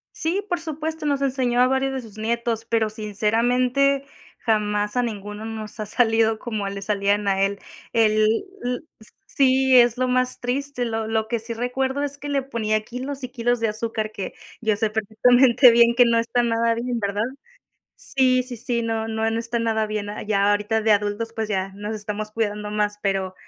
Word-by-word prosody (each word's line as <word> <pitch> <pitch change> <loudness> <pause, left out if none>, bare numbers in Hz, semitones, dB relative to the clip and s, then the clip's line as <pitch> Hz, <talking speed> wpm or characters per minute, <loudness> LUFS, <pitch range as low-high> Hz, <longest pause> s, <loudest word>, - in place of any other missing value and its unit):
Sí, 375 +6 -1
por 355 -3 -1
supuesto. 315 -1 -4
Nos 280 -1 0
enseñó 255 -2 +1
a 250 - +6
varios 265 +1 +1
de 260 - -3
sus 215 -1 -11
nietos, 230 0 -1
pero 225 -2 0
sinceramente, 245 +6 +1 0.3
jamás 210 -1 0
a 245 - +3
ninguno 210 -2 -5
nos 220 -1 -7
ha 210 - -3
salido 225 -1 +2
como 215 -5 -4
le 200 0 -6
salían 205 0 0
a 195 0 +2
él. 200 0 +1 0.4
El 215 -2 +3 0.4
l 245 +2 -2 0.4
sí, 265 -1 +3
es 240 -1 +6
lo 255 0 +1
más 255 0 +1
triste. 250 0 -2
Lo 225 -1 -2
lo 220 0 0
que 235 0 -1
sí 230 +1 -6
recuerdo 265 +3 -1
es 285 0 -3
que 290 - -6
le 275 -2 0
ponía 215 -5 -1
kilos 260 +4 -6
y 255 - -4
kilos 245 -1 0
de 225 - +1
azúcar 220 0 -3
que 200 -3 -6 0.3
yo 220 -2 +1
sé 215 0 0
perfectamente 240 +4 +5
bien 235 0 +5
que 245 -1 +6
no 230 -1 +3
está 230 +1 0
nada 230 0 +1
bien, 240 0 -2
¿verdad? 205 +1 -1 0.7
Sí, 255 -2 +2
sí, 245 -2 -7
sí, 235 +1 -2
no, 225 -1 -2
no, 220 0 -1
no 225 - -1
está 235 +1 -2
nada 220 -1 0
bien, 210 -1 -3 0.2
ya 200 -1 +3
ahorita 210 +2 0
de 220 0 +2
adultos, 210 +2 0
pues, 220 -1 -3
ya 190 -1 -1
nos 210 +2 -5
estamos 210 0 -4
cuidando 210 -2 -2
más, 210 0 -1
pero 195 -2 -1
230 Hz, 190 wpm, -23 LUFS, 215-250 Hz, 0.7 s, a